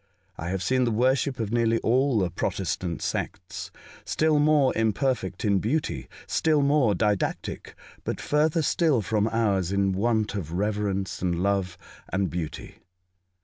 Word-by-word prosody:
I 85 Hz, -, -5 dB
have 95 Hz, 0 st, -2 dB
seen 130 Hz, +5 st, +2 dB
the 120 Hz, -, +2 dB
worship 130 Hz, +3 st, +1 dB
of 110 Hz, -2 st, -2 dB
nearly 115 Hz, -1 st, +2 dB
all 130 Hz, +1 st, +2 dB
the 90 Hz, -4 st, +1 dB
Protestant 85 Hz, 0 st, -2 dB
sects 95 Hz, -1 st, -4 dB, 0.2 s
— -, -, -19 dB
still 155 Hz, -1 st, +2 dB
more 145 Hz, -3 st, +4 dB
imperfect 110 Hz, -3 st, 0 dB
in 100 Hz, -2 st, +3 dB
beauty, 110 Hz, -, -2 dB, 0.2 s
still 155 Hz, -3 st, +2 dB
more 140 Hz, -7 st, +3 dB
didactic, 105 Hz, +1 st, -2 dB, 0.3 s
but -, -, -3 dB
further 155 Hz, +2 st, +1 dB
still 150 Hz, -6 st, +2 dB
from 105 Hz, +3 st, +1 dB
ours 100 Hz, -6 st, +1 dB
in 100 Hz, -1 st, +2 dB
want 110 Hz, +2 st, 0 dB
of 85 Hz, -6 st, -4 dB
reverence 100 Hz, 0 st, -1 dB
and 90 Hz, -1 st, 0 dB
love, 95 Hz, -3 st, 0 dB, 0.3 s
and 95 Hz, 0 st, 0 dB
beauty. 85 Hz, -3 st, -6 dB
105 Hz, 145 wpm, -26 LUFS, 95-130 Hz, 0.3 s, more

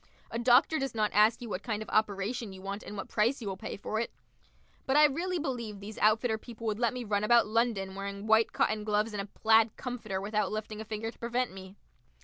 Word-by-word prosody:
A 230 Hz, -, -2 dB
doctor 250 Hz, +6 st, +4 dB
does 270 Hz, -3 st, -3 dB
not 215 Hz, -1 st, +1 dB
ask 215 Hz, +3 st, +4 dB
you 235 Hz, -, -6 dB
what 195 Hz, -, -3 dB
kind 215 Hz, -1 st, -3 dB
of -, -, -13 dB
operation 215 Hz, +1 st, 0 dB
you 190 Hz, 0 st, -11 dB
want 200 Hz, +2 st, -4 dB
and 210 Hz, -, -8 dB
what 195 Hz, -, -5 dB
price 230 Hz, +6 st, +1 dB
you 225 Hz, -, -6 dB
will 195 Hz, -, -2 dB
pay 190 Hz, -, -6 dB
for 215 Hz, +2 st, -3 dB
it. 230 Hz, -, -1 dB, 0.8 s
But 265 Hz, +2 st, +3 dB
I 300 Hz, -, +8 dB
really 345 Hz, +6 st, 0 dB
believe 240 Hz, -9 st, -4 dB
these 205 Hz, +2 st, -8 dB
outfitter 220 Hz, +1 st, +3 dB
people 230 Hz, 0 st, -10 dB
would 215 Hz, -1 st, -1 dB
let 235 Hz, -2 st, +2 dB
me 250 Hz, -1 st, -5 dB
run 205 Hz, -2 st, 0 dB
about 235 Hz, +2 st, +5 dB
London 215 Hz, -3 st, 0 dB
wearing 200 Hz, +1 st, -5 dB
white 220 Hz, +1 st, +4 dB
cotton 215 Hz, 0 st, 0 dB
gloves 210 Hz, +1 st, 0 dB
and 205 Hz, -, -2 dB
a 200 Hz, -, -7 dB
plaid 220 Hz, +1 st, +3 dB
comforter 235 Hz, -6 st, -4 dB
without 210 Hz, +2 st, -1 dB
lifting 215 Hz, 0 st, -4 dB
a -, -, -7 dB
finger 220 Hz, +1 st, -4 dB
to -, -, -25 dB
prevent 240 Hz, -1 st, -1 dB
me. 190 Hz, 0 st, -10 dB
220 Hz, 235 wpm, -30 LUFS, 205-235 Hz, 0.8 s, I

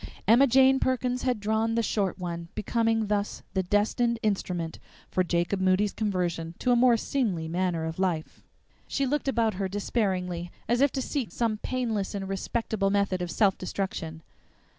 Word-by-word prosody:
Emma 240 Hz, +6 st, +6 dB
Jane 265 Hz, +1 st, +5 dB
Perkins 250 Hz, -1 st, 0 dB
had 250 Hz, -4 st, 0 dB
drawn 220 Hz, +2 st, 0 dB
the 230 Hz, -, +2 dB
short 200 Hz, -4 st, 0 dB
one, 170 Hz, -2 st, -5 dB
becoming 225 Hz, +1 st, +1 dB
thus 205 Hz, 0 st, -2 dB
the 190 Hz, -, +2 dB
destined 210 Hz, +5 st, +1 dB
instrument 180 Hz, -5 st, -2 dB, 0.3 s
for 185 Hz, -, +2 dB
Jacob 175 Hz, +2 st, 0 dB
Moody's 190 Hz, +2 st, +2 dB
conversion 175 Hz, -5 st, -2 dB
to 250 Hz, -, +1 dB
a -, -, +5 dB
more 240 Hz, -1 st, +5 dB
seemly 210 Hz, -11 st, -1 dB
manner 170 Hz, -1 st, -1 dB
of 160 Hz, +2 st, -5 dB
life! 175 Hz, -5 st, -1 dB, 0.5 s
She 275 Hz, -, 0 dB
looked 290 Hz, +2 st, -1 dB
about 230 Hz, -4 st, +2 dB
her 195 Hz, -, +1 dB
despairingly, 185 Hz, -4 st, -1 dB, 0.2 s
as 240 Hz, +3 st, +2 dB
if 280 Hz, -1 st, +4 dB
to 265 Hz, -, -1 dB
seek 270 Hz, -4 st, -3 dB
some 225 Hz, -3 st, 0 dB
painless 225 Hz, -7 st, -2 dB
and 195 Hz, -1 st, -4 dB
respectable 195 Hz, +1 st, -1 dB
method 200 Hz, -2 st, +1 dB
of 175 Hz, -, -3 dB
self 195 Hz, +2 st, +2 dB
destruction. 165 Hz, -4 st, -4 dB
205 Hz, 165 wpm, -27 LUFS, 185-235 Hz, 0.5 s, Emma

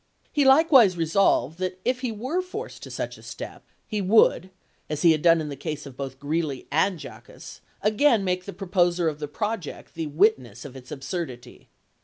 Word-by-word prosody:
He 290 Hz, -2 st, +2 dB
likewise 265 Hz, -, +6 dB
resolved 165 Hz, -3 st, +2 dB
that 185 Hz, 0 st, -3 dB
if 250 Hz, 0 st, +1 dB
he 250 Hz, -3 st, -2 dB
were 255 Hz, -, -2 dB
forced 410 Hz, +6 st, -8 dB
to -, -, -9 dB
such -, -, -5 dB
a -, -, -15 dB
step, -, -, -9 dB, 0.2 s
he 210 Hz, -1 st, -3 dB
would, 190 Hz, -2 st, +4 dB, 0.4 s
as 150 Hz, -1 st, -3 dB
he 170 Hz, -, +7 dB
had 155 Hz, -1 st, +1 dB
done 165 Hz, 0 st, +5 dB
in 155 Hz, -1 st, -4 dB
the 140 Hz, -, -5 dB
case 150 Hz, +2 st, -5 dB
of 135 Hz, -3 st, -10 dB
both 135 Hz, -1 st, -6 dB
Greeley 145 Hz, -2 st, -2 dB
and 190 Hz, -2 st, +2 dB
Jaquess, -, -, -11 dB, 0.2 s
again 215 Hz, +1 st, +3 dB
make 180 Hz, -1 st, -1 dB
the 200 Hz, -, -6 dB
proposer 175 Hz, -3 st, +1 dB
of 150 Hz, -2 st, -2 dB
the 150 Hz, -, -4 dB
project 210 Hz, +2 st, -5 dB
the 165 Hz, -1 st, -4 dB
witness 145 Hz, -, +1 dB
of 135 Hz, -2 st, -10 dB
its 130 Hz, +2 st, -12 dB
absurdity. 135 Hz, -3 st, -6 dB
175 Hz, 190 wpm, -25 LUFS, 150-210 Hz, 0.4 s, he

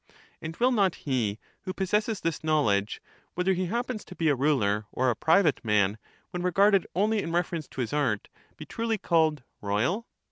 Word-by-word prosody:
And 160 Hz, +1 st, -6 dB
will 250 Hz, +2 st, +3 dB
not 200 Hz, -7 st, +2 dB
he 120 Hz, -7 st, 0 dB, 0.2 s
who 185 Hz, -1 st, -6 dB
possesses 210 Hz, +2 st, 0 dB
this 165 Hz, -2 st, -2 dB
knowledge, 110 Hz, -10 st, +1 dB, 0.3 s
whether 180 Hz, +2 st, +2 dB
that 180 Hz, -, -3 dB
a -, -, +1 dB
he -, -, -5 dB
happens 240 Hz, 0 st, -2 dB
to 180 Hz, -, -11 dB
be 165 Hz, -2 st, +1 dB
a 145 Hz, -, +3 dB
ruler 110 Hz, -7 st, +1 dB
or 130 Hz, 0 st, +1 dB
a -, -, -2 dB
private 160 Hz, -, +3 dB
man, 105 Hz, -1 st, +2 dB, 0.3 s
when 180 Hz, -, -4 dB
regarded 195 Hz, +2 st, +4 dB
{^® -, -, -18 dB
only 210 Hz, +3 st, +2 dB
in 165 Hz, -, -4 dB
reference 170 Hz, -3 st, -1 dB
to 130 Hz, -, -5 dB
his 115 Hz, 0 st, -3 dB
art, 125 Hz, -9 st, 0 dB, 0.3 s
be -, -, -8 dB
truly 225 Hz, -1 st, -2 dB
called 160 Hz, -7 st, +1 dB
' -, -, -50 dB
royal 120 Hz, -, 0 dB
165 Hz, 205 wpm, -27 LUFS, 125-195 Hz, 0.3 s, regarded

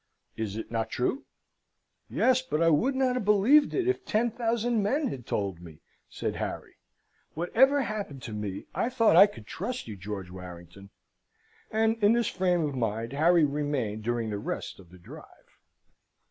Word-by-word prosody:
Is 110 Hz, -3 st, -4 dB
it 110 Hz, -, -7 dB
not 115 Hz, -1 st, -1 dB
true?" 185 Hz, -, -2 dB, 0.8 s
"Yes, 255 Hz, 0 st, +3 dB
but 255 Hz, -12 st, -2 dB
I 165 Hz, 0 st, +4 dB
would 250 Hz, -, +2 dB
not 260 Hz, -1 st, +2 dB
have 250 Hz, -, -2 dB
believed 210 Hz, +9 st, +5 dB
it, 375 Hz, -2 st, 0 dB
if 380 Hz, -, 0 dB
ten 235 Hz, +2 st, 0 dB
thousand 230 Hz, 0 st, 0 dB
men 265 Hz, +7 st, 0 dB
had 125 Hz, -, -8 dB
told 95 Hz, -4 st, -2 dB
me," 80 Hz, -3 st, -12 dB, 0.3 s
said -, -, -4 dB
Harry. -, -, -5 dB, 0.6 s
"Whatever 265 Hz, -, +3 dB
happened 200 Hz, -, -5 dB
to 110 Hz, -, -6 dB
me, 105 Hz, -2 st, -5 dB
I 235 Hz, -, 0 dB
thought 230 Hz, -8 st, +3 dB
I 195 Hz, +4 st, +9 dB
could 155 Hz, -, -12 dB
trust 245 Hz, -, -5 dB
you, 110 Hz, -, -6 dB
George 95 Hz, -1 st, -7 dB
Warrington." 90 Hz, +1 st, -11 dB, 0.8 s
And 225 Hz, 0 st, 0 dB
in 205 Hz, +2 st, +6 dB
this 235 Hz, -1 st, +1 dB
frame 180 Hz, -2 st, +1 dB
of 150 Hz, -3 st, -1 dB
mind 115 Hz, 0 st, -2 dB
Harry 165 Hz, +2 st, +4 dB
remained 140 Hz, -7 st, -2 dB
during 115 Hz, -1 st, -1 dB
the 100 Hz, -, -3 dB
rest -, -, -5 dB
of 90 Hz, -3 st, -16 dB
the 90 Hz, -, -15 dB
drive. 85 Hz, -, -15 dB
160 Hz, 175 wpm, -28 LUFS, -, 0.8 s, I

